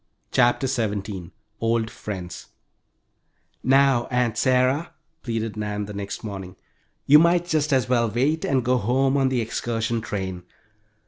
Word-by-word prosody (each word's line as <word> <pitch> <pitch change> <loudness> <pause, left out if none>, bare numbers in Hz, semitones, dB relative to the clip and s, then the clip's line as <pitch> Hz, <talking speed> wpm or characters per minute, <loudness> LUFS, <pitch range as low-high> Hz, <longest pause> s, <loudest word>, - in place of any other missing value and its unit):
CHAPTER 120 +2 +3
XVII 105 -7 -2 0.3
OLD 115 0 0
FRIENDS 90 -4 -7 1.2
"Now, 135 -2 +4
Aunt 125 -3 0
Sarah," 130 +6 +1 0.3
pleaded 115 -2 -3
Nan 105 -1 -3
the 105 - -8
next 100 +2 -6
morning, 95 -4 -7 0.5
"you 150 +2 +8
might 170 +1 +3
just 155 -3 0
as 130 -2 +2
well 120 -2 +2
wait 140 +8 0
and 130 -2 +1
go 125 +1 +3
home 130 +5 +1
on 135 -1 +2
the 130 -2 0
excursion 115 0 -2
train. 95 -4 -4
120 Hz, 135 wpm, -24 LUFS, 105-135 Hz, 1.2 s, you